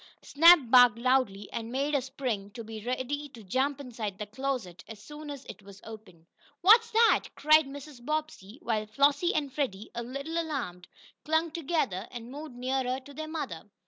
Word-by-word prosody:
Snap 335 Hz, +4 st, +8 dB
barked 245 Hz, -3 st, +7 dB
loudly 235 Hz, -5 st, +1 dB
and 230 Hz, 0 st, -4 dB
made 280 Hz, +3 st, -1 dB
a 285 Hz, -, +2 dB
spring, 245 Hz, -6 st, -4 dB
to 230 Hz, -, -6 dB
be 220 Hz, -1 st, -8 dB
ready 260 Hz, +4 st, -3 dB
to 235 Hz, -4 st, -13 dB
jump 265 Hz, +8 st, -1 dB
inside 230 Hz, -7 st, -6 dB
the 210 Hz, -, -5 dB
closet 235 Hz, -5 st, -4 dB
as 220 Hz, -, -9 dB
soon 295 Hz, +6 st, -10 dB
as 280 Hz, -2 st, -8 dB
it -, -, -10 dB
was 200 Hz, 0 st, -14 dB
opened. 210 Hz, -7 st, -12 dB, 0.4 s
"What's 455 Hz, +5 st, +6 dB
that?" 460 Hz, 0 st, +4 dB
cried 310 Hz, -1 st, +5 dB
Mrs. 280 Hz, -2 st, -10 dB
Bobbsey, 305 Hz, -7 st, -4 dB
while 215 Hz, -5 st, -1 dB
Flossie 280 Hz, -, +2 dB
and 285 Hz, -4 st, -1 dB
Freddie, 220 Hz, -8 st, -3 dB
a 235 Hz, -, -4 dB
little 275 Hz, +7 st, -4 dB
alarmed, 240 Hz, -, -5 dB, 0.4 s
clung 320 Hz, +2 st, +1 dB
together 270 Hz, -, -2 dB
and 240 Hz, 0 st, -9 dB
moved 290 Hz, -2 st, -8 dB
nearer 255 Hz, +1 st, -1 dB
to 285 Hz, +2 st, -14 dB
their 310 Hz, +2 st, -6 dB
mother. 210 Hz, -, -6 dB
260 Hz, 175 wpm, -29 LUFS, 220-295 Hz, 0.4 s, Snap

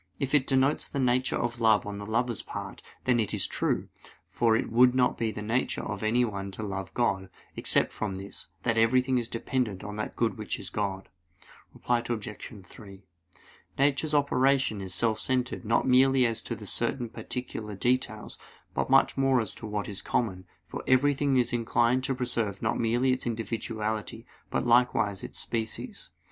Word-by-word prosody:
If 135 Hz, 0 st, -2 dB
it 140 Hz, -3 st, +4 dB
denotes 135 Hz, +2 st, +2 dB
the -, -, -5 dB
nature 130 Hz, -1 st, +2 dB
of 120 Hz, 0 st, -2 dB
love 110 Hz, -2 st, +4 dB
on 100 Hz, 0 st, -5 dB
the 100 Hz, -, -7 dB
lover's 120 Hz, 0 st, 0 dB
part, -, -, -7 dB, 0.2 s
then 125 Hz, -2 st, +2 dB
it 110 Hz, -, 0 dB
is -, -, 0 dB
true; -, -, -1 dB, 0.4 s
for 115 Hz, -2 st, +2 dB
it 115 Hz, -, -1 dB
would 125 Hz, +2 st, +5 dB
not 125 Hz, -1 st, +3 dB
be 115 Hz, -1 st, -1 dB
in -, -, -7 dB
the 105 Hz, -, -5 dB
nature 115 Hz, +4 st, 0 dB
of 105 Hz, -2 st, -4 dB
anyone 110 Hz, -3 st, 0 dB
to 110 Hz, -, -5 dB
love 95 Hz, -2 st, -4 dB
God, 95 Hz, -6 st, 0 dB, 0.3 s
except -, -, +2 dB
from 105 Hz, -3 st, -3 dB
this 95 Hz, +1 st, -7 dB, 0.2 s
that 115 Hz, -2 st, +2 dB
everything 125 Hz, +3 st, +3 dB
is 120 Hz, -, -3 dB
dependent 115 Hz, -4 st, -2 dB
on 105 Hz, 0 st, -6 dB
that 105 Hz, -, -4 dB
good 115 Hz, -1 st, 0 dB
which 105 Hz, -, -3 dB
is -, -, -7 dB
God. 95 Hz, -2 st, -3 dB, 0.6 s
Reply 120 Hz, -1 st, 0 dB
Obj. 105 Hz, -3 st, -6 dB
3: 100 Hz, 0 st, -13 dB, 0.7 s
Nature's 145 Hz, +2 st, +2 dB
operation 135 Hz, -6 st, +2 dB
is 95 Hz, -1 st, -4 dB
self 110 Hz, +2 st, +1 dB
centered 130 Hz, -1 st, -1 dB
not 115 Hz, +3 st, +1 dB
merely 130 Hz, 0 st, +5 dB
as 115 Hz, -1 st, 0 dB
to -, -, -6 dB
certain 125 Hz, -3 st, 0 dB
particular 110 Hz, -2 st, -5 dB
details, 115 Hz, 0 st, -1 dB, 0.3 s
but -, -, -1 dB
much -, -, +4 dB
more 135 Hz, -1 st, +3 dB
as 110 Hz, -4 st, -1 dB
to 110 Hz, -, -8 dB
what 105 Hz, -1 st, -3 dB
is 100 Hz, -2 st, -3 dB
common; 95 Hz, -6 st, -1 dB, 0.2 s
for -, -, -7 dB
everything 140 Hz, +1 st, +3 dB
is 120 Hz, -1 st, +1 dB
inclined 120 Hz, +2 st, +2 dB
to 135 Hz, -1 st, -1 dB
preserve 115 Hz, -6 st, -2 dB
not -, -, -1 dB
merely 120 Hz, +3 st, +2 dB
its 130 Hz, -1 st, -1 dB
individuality, 110 Hz, 0 st, -3 dB, 0.2 s
but -, -, -1 dB
likewise 120 Hz, -5 st, +3 dB
its -, -, -7 dB
species. 110 Hz, -1 st, -3 dB
115 Hz, 180 wpm, -28 LUFS, 105-125 Hz, 0.7 s, would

